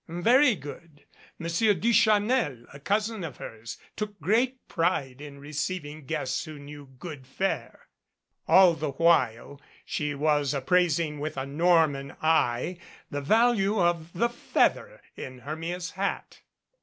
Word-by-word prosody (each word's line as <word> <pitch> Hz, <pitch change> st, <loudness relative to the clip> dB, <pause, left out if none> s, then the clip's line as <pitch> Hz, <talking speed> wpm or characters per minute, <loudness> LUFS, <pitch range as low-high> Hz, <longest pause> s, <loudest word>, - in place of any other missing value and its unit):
Very 235 Hz, -, +4 dB
good. 150 Hz, -1 st, -11 dB, 0.3 s
Monsieur 175 Hz, +6 st, +1 dB
Duchanel, 215 Hz, -, +2 dB
a 140 Hz, -, -10 dB
cousin 210 Hz, +5 st, -1 dB
of 155 Hz, -6 st, -6 dB
hers, 115 Hz, 0 st, -8 dB, 0.2 s
took 210 Hz, -1 st, -5 dB
great 250 Hz, +5 st, 0 dB
pride 150 Hz, -7 st, -1 dB
in 145 Hz, -1 st, -9 dB
receiving 150 Hz, 0 st, -5 dB
guests 130 Hz, 0 st, -2 dB
who 155 Hz, -2 st, -9 dB
knew 145 Hz, 0 st, -11 dB
good 150 Hz, -5 st, -9 dB
fare. 195 Hz, +7 st, -3 dB, 0.6 s
All 185 Hz, -2 st, +7 dB
the 155 Hz, -3 st, -4 dB
while 145 Hz, -4 st, +2 dB, 0.2 s
she 150 Hz, -1 st, -2 dB
was 145 Hz, -1 st, +1 dB
appraising 160 Hz, +1 st, +1 dB
with 150 Hz, 0 st, -4 dB
a 135 Hz, -, -2 dB
Norman 150 Hz, -2 st, +2 dB
eye 160 Hz, +1 st, +1 dB, 0.3 s
the 145 Hz, -, -3 dB
value 215 Hz, +3 st, +3 dB
of 170 Hz, -2 st, +1 dB
the 235 Hz, +7 st, +1 dB
feather -, -, 0 dB
in 130 Hz, -1 st, -8 dB
Hermia's 165 Hz, +6 st, -5 dB
hat. 195 Hz, +1 st, -4 dB
165 Hz, 130 wpm, -27 LUFS, 145-195 Hz, 0.6 s, All